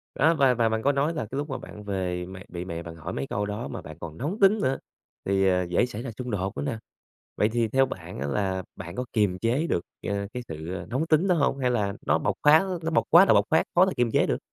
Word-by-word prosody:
Đó 160 +5 +4
và 135 -5 +4
và 115 -1 +2
bạn 110 0 -1
có 140 - +4
nói 145 +4 +1
là 150 - -3
cái 135 - -3
lúc 145 +1 -3
mà 135 - -3
bạn 105 - -10
về 90 -3 -2
mẹ 95 0 -10
bị 90 0 -6
mẹ 85 -2 -5
bạn 85 -1 -8
hỏi 80 +2 -6
mấy 135 - -3
câu 105 +1 -2
đó 105 +4 -4
mà - - -6
bạn 80 -1 -10
còn 80 -2 -8
nóng 170 - -3
tính 200 +2 +5
nữa, 130 +1 +1 0.5
thì, 95 0 +2
ờ, 90 -1 +3
dễ 90 +7 +1
xảy 115 -2 -6
ra 125 -1 -5
xung 125 -2 -4
đột 95 -1 -2
nữa - - -2
nè. 135 -6 -2 0.6
Vậy 105 - +3
thì 115 0 0
theo 135 +4 +3
bạn 90 - -8
á 70 - -2
là 95 +4 -1
bạn 85 0 -8
có 125 - -2
kiềm 100 -5 +1
chế 125 - +1
được, 85 - 0 0.3
ờ, 100 0 -1
cái 125 - -3
sự, 80 +2 -6
ờ, 90 -1 -6
nóng 135 +7 -1
tính 165 +4 +3
đó 180 - +4
hông? 140 -3 +1
Hay 125 -2 +1
là 105 -5 0
nó - - +3
bộc - - 0
phát 150 +2 +8
á, 195 - -1 0.2
nó 165 - -1
bộc 160 - +2
quá 175 +4 +9
là - - +5
bộc - - +5
phát 160 - +4
khó 180 +2 +7
là 190 - 0
kiềm 120 -2 +2
chế - - +3
được? - - 0
115 Hz, 295 wpm, -26 LUFS, 95-140 Hz, 0.6 s, quá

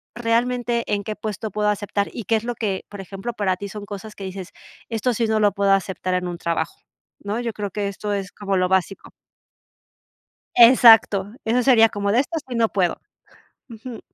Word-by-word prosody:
realmente 240 0 0
en 205 0 -1
qué 215 0 -4
puesto 215 0 -5
puedo 210 +1 0
aceptar 205 0 -1
y 230 - -6
qué 225 - +2
es 220 - -1
lo 240 0 -3
que, 205 -4 -3
por 205 -1 -9
ejemplo, 195 +5 -6
para 190 -3 0
ti 200 - -6
son 205 +1 -8
cosas 205 +1 -8
que 200 - -10
dices, 190 0 -7 0.4
esto 235 +2 0
sí 230 - +1
no 220 0 +1
lo 205 -2 +3
puedo 200 -1 +1
aceptar 190 -1 0
en 180 0 -1
un 175 -1 -5
trabajo, 170 -1 -3 0.4
¿no? 205 +3 -3
yo 240 -1 -2
creo 205 -3 -5
que 205 0 -2
esto 205 +1 -4
es 195 -1 -4
como 200 -2 -3
lo 185 0 +1
básico. 190 +1 -1 1.5
Exacto. 225 -4 +7
Eso 240 +3 +2
sería 235 -4 +6
como 200 -1 -2
de 245 - +4
estas 315 +2 -3
sí 245 - -5
no 230 -1 +2
puedo, 180 -4 0 0.7
uju. 230 +1 -9
210 Hz, 200 wpm, -22 LUFS, 195-230 Hz, 1.5 s, Exacto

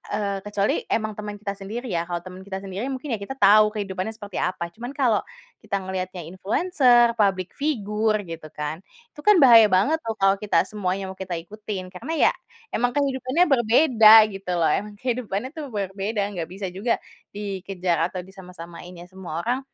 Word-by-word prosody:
eee, 200 -2 -2
kecuali 205 -1 0 0.2
emang 215 -1 0
teman 210 0 -6
kita 205 -1 -3
sendiri 220 +6 -6
ya 170 -2 0
kalau 175 -1 -2
teman 185 0 -10
kita 190 -1 -4
sendiri 195 +3 -5
mungkin 265 +1 -5
ya 210 - -9
kita 270 +7 -6
tahu 210 +1 +6
kehidupannya 195 0 -3
seperti 205 -3 -7
apa 175 -1 -2
cuman 240 +3 -6
kalo, 255 -6 +1 0.4
kita 200 - -2
ngelihatnya 185 -3 -4
influencer, 240 - +3
public 195 -4 0
figure 215 -6 0
gitu 165 -2 -8
kan, 150 +4 -5 0.3
itu 295 - -10
kan 420 -1 +6
bahaya 235 -6 +8
banget 280 +13 +3
tuh 225 -1 -3
kalau 195 0 +4
kita 200 -4 +1
semuanya 195 -2 -3
mau - - -10
kita 185 -2 -5
ikutin 205 +1 -7
karena 200 - -7 0.2
ya, - - +4 0.4
emang 245 +2 +1
kehidupannya 275 +3 +1
berbeda 235 -2 +5 0.2
gitu 195 -2 -6
loh 160 - +3
emang 205 0 -3
kehidupannya 245 -3 -2
itu 315 - -5
berbeda 200 +1 -2
enggak 180 -5 -5
bisa 195 +1 -5
juga, 195 +6 -1 0.4
dikejar 190 -4 -2
atau 185 - -5
disama-samain 180 -2 -11
ya 175 +1 -11
semua 175 -4 -6
orang, 245 +3 0
205 Hz, 175 wpm, -24 LUFS, 185-230 Hz, 0.4 s, bahaya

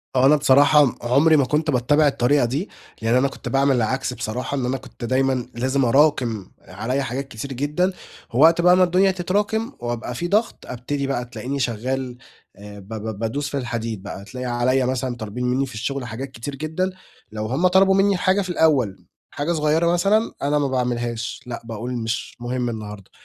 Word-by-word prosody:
هو 130 - +4
أنا 145 +3 +7
بصراحة 145 +1 +5
م 125 - -2
عمري 140 +6 +4
ما 135 - +3
كنت 150 +3 0
باتّبع 145 +5 +3
الطريقة 135 0 +2
دي، 145 - -2 0.3
لإن 115 +2 +2
أنا 135 +2 +4
كنت - - -7
باعمل 135 0 +3
العكس 125 +2 -1
بصراحة، 125 +4 -4
إن 125 - -1
أنا 130 +2 -1
كنت 125 -1 -9
دايمًا 130 0 +1
لازم 130 +2 +1
اراكِم 125 -6 +2
عليَّ 120 +8 -3
حاجات 135 +3 -4
كتير 135 +3 -6
جدًا، 150 +8 0 0.4
ووقت 165 +7 +5
بقى 180 +1 +6
ما 185 - +6
الدنيا 185 +2 +3
تتراكم 205 +5 -1
وأبقى 120 0 -4
في 170 +8 -2
ضغط، 215 +5 0
ابتدي 135 +3 -3
بقى 130 -3 -2
تلاقيني 125 +3 -5
شغال 125 +1 -2 0.4
آآ، 105 0 -11
ب 95 - -14
ب 110 -1 -5
بادوس 140 +6 -2
في 140 - -3
الحديد 115 -5 -4
بقى، 100 -1 -7
تلاقي 125 +4 -7
عليَّ 125 +1 +1
مثلًا 130 -1 -2
طالبين 115 +2 -5
مني 130 +2 +1
في 125 - -10
الشغل 130 +4 -3
حاجات 130 +4 -6
كتير 135 +3 -6
جدًا، 160 +6 -2 0.4
لو 110 0 -4
هُم 135 +11 +2
طلبوا 190 +1 +4
مني 195 +1 +4
الحاجة 185 +2 +2
في 185 - -5
الأول، 145 - +1 0.3
حاجة 145 +4 -2
صغيّرة 155 +2 +2
مثلًا 205 +6 +2
أنا 145 +1 +1
ما 140 - +1
باعملهاش، 120 -2 -2
لأ 120 -1 -6
باقول: 115 +2 -5
"مش 115 0 -3
مهم 120 0 -2
النهارده، 105 -3 -7
130 Hz, 190 wpm, -22 LUFS, 120-150 Hz, 0.4 s, أنا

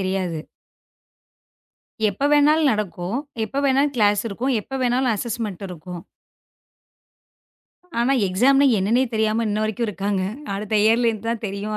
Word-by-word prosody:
தெரியாது. 185 -3 -2 1.7
எப்ப 240 +9 -1
வேணாலும் 295 0 +4
நடக்கும். 200 -1 -3 0.3
எப்ப 275 +6 -3
வேணாலும் 275 +2 +2
க்ளேஸ் 205 -2 +3
இருக்கும். 250 +6 -1
எப்ப 270 +5 -7
வேணாலும் 250 0 +2
அஸ்ஸஸ்மென்ட் 215 -3 -4
இருக்கும். 175 0 -8 2.0
ஆனா 240 +3 +2 0.2
எக்ஸாம் 255 +9 +3 0.2
என்னன்னே 220 +7 +2
தெரியாம 220 +1 +1
இன்ன 210 +1 -1
வரைக்கும் 220 +2 -2
இருக்காங்க. 200 -1 -2 0.3
அடுத்த 210 +2 -4
இயர் 225 +2 +4 0.3
தான் 230 -1 -2
தெரியும். 205 +2 -4
215 Hz, 115 wpm, -22 LUFS, 195-250 Hz, 2.0 s, வேணாலும்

